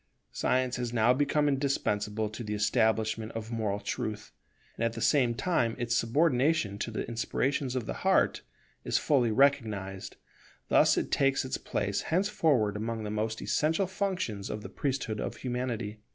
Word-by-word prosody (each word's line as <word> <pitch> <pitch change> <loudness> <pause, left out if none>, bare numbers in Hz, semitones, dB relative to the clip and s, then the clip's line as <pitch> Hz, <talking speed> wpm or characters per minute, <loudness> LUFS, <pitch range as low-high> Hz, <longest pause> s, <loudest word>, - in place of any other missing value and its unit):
Science 130 -1 0
has 120 -1 -3
now 120 +1 +4
become 145 +2 +1
indispensable 110 -6 0
to 110 +3 -7
the 105 -1 -3
establishment 110 0 +1
of 115 0 -6
moral 105 -3 -1
truth, 105 - -4 0.4
and - - -3
at 115 -1 +1
the 115 - -6
same 120 -1 +3
time 130 -5 0
its 120 -1 -1
subordination 125 -3 +2
to 115 - -2
the 110 - -4
inspirations 125 +3 -1
of 125 -3 -2
the - - -3
heart - - +3 0.4
is - - +1
fully 130 -6 +2
recognized; 110 -7 +1 0.5
thus - - +5
it - - -1
takes 135 -1 +2
its 130 - -3
place - - -2
henceforward 160 - +2
among 110 +1 -3
the 105 - -4
most 110 +1 -2
essential 160 +6 +1
functions 185 - -3
of 105 - -5
the - - -7
priesthood 130 -6 -2
of - - -4
Humanity. 120 -4 -3
115 Hz, 160 wpm, -29 LUFS, 110-135 Hz, 0.5 s, thus